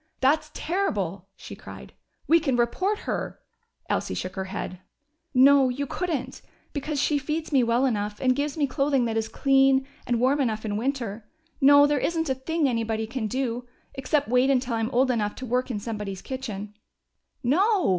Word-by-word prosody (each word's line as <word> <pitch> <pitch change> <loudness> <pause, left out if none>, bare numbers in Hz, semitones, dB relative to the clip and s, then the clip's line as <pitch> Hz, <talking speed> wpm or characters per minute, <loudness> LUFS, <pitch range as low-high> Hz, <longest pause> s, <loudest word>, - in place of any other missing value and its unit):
"That's 300 +3 +2
terrible!" 200 - -2
she - - -10
cried. - - -11 0.3
"We 335 +2 +6
can 280 -6 0
report 370 - 0
her - - -4 0.3
" - - -41
Elsie - - -1
shook 185 0 -4
her 190 -1 -3
head. 185 -1 -5 0.5
"No, 270 0 +6
you 275 +3 -2
couldn't. 335 0 -3 0.3
Because 290 0 -3
she 290 +1 +2
feeds 310 +3 -3
me 275 -3 +4
well 240 +2 +2
enough 210 -4 -1
and 255 -1 +2
gives 290 +2 -2
me 295 - +2
clothing 275 -1 +1
that 225 -1 -2
is 225 0 0
clean, 270 -1 +3 0.2
and 240 -1 +1
warm 270 +4 +2
enough 220 -4 -1
in 205 -1 -2
winter. 230 -3 -3 0.3
No, 285 +1 +8
there 290 -1 +1
isn't 325 0 -1
a - - +3
thing 295 +4 -1
anybody 225 -2 -1
can 225 0 -3
do. 245 0 -2 0.3
Except 285 +2 0
wait 250 +3 +3
until 255 -2 +1
I'm 225 0 0
old 260 0 +2
enough 210 -4 -1
to 260 - -7
work 250 +2 0
in 235 - -2
somebody's 210 -3 -5
kitchen." 215 -6 -6 0.7
"No!" 375 - +3
260 Hz, 180 wpm, -25 LUFS, 225-285 Hz, 0.7 s, No